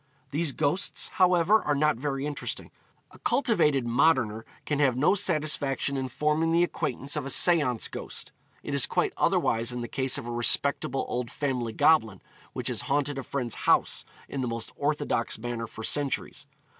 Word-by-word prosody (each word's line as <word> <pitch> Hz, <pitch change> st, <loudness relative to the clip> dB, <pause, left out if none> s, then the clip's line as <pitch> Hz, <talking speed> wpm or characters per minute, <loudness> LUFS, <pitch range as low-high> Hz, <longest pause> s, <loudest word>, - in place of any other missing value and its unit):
These 150 Hz, -1 st, 0 dB
ghosts, 155 Hz, +8 st, 0 dB
however, 180 Hz, +4 st, +4 dB
are 145 Hz, -, 0 dB
not 150 Hz, 0 st, +2 dB
very 135 Hz, +1 st, -3 dB
interesting. 150 Hz, -1 st, -4 dB, 0.4 s
A -, -, -17 dB
cultivated 175 Hz, -, +2 dB
moderner 120 Hz, -3 st, +2 dB, 0.2 s
can 145 Hz, -1 st, -1 dB
have 135 Hz, -4 st, +2 dB
no 150 Hz, +8 st, +4 dB
satisfaction 150 Hz, -7 st, 0 dB
in 130 Hz, -1 st, -2 dB
forming 150 Hz, +5 st, 0 dB
the 170 Hz, +1 st, +4 dB
acquaintance 140 Hz, -4 st, -2 dB
of 150 Hz, -, -2 dB
a 135 Hz, -, -5 dB
seance 145 Hz, -7 st, +4 dB
ghost; -, -, -7 dB, 0.3 s
it -, -, -5 dB
is -, -, +1 dB
quite -, -, 0 dB
otherwise 115 Hz, +2 st, +1 dB
in 125 Hz, 0 st, -4 dB
the 120 Hz, -, -4 dB
case 130 Hz, +1 st, -1 dB
of -, -, -6 dB
a 120 Hz, -, -5 dB
respectable 130 Hz, +3 st, +1 dB
old 125 Hz, -1 st, -3 dB
family 125 Hz, -4 st, -2 dB
goblin 110 Hz, -, +3 dB, 0.3 s
which -, -, -4 dB
has -, -, -1 dB
haunted 145 Hz, 0 st, 0 dB
a -, -, -5 dB
friend's 125 Hz, -5 st, -3 dB, 0.2 s
house -, -, +2 dB, 0.2 s
in 135 Hz, -, -4 dB
the 125 Hz, -, -2 dB
most 115 Hz, -1 st, -4 dB
orthodox 145 Hz, -5 st, -1 dB
manner 115 Hz, 0 st, -4 dB
for 110 Hz, -, -9 dB
centuries. 145 Hz, +2 st, -1 dB
140 Hz, 170 wpm, -27 LUFS, 120-150 Hz, 0.4 s, however